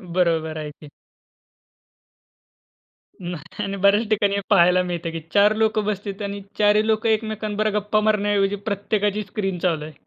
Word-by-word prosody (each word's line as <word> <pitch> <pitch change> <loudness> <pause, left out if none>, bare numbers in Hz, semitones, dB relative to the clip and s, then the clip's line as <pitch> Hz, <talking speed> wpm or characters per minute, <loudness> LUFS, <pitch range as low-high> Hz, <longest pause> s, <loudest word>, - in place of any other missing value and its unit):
बरोबर 165 -3 +1
आहे 150 -1 -5
की, 150 0 -15 2.3
मग. 175 -2 -5 0.2
आणि 200 0 -4
बऱ्याच 200 +3 +3
ठिकाणी 205 -2 +2
हे 200 - -1
पाहायला 180 -3 +5
मिळत 175 -2 -4
की 165 - -4
4 205 +1 +5
लोकं 220 -1 +1
बसलेतं. 200 -1 -4
आणि 200 0 -5 0.2
4ही 210 0 +4
लोक 220 +1 0
एकमेकांबरोबर 215 -1 -1
गप्पा 210 +1 0
मारण्याऐवजी 205 -2 +1
प्रत्येकाची 205 +1 -1
स्क्रीन 195 -2 -3
चालू 165 -4 -1
आहे. 155 - -10
200 Hz, 145 wpm, -22 LUFS, 180-215 Hz, 2.3 s, पाहायला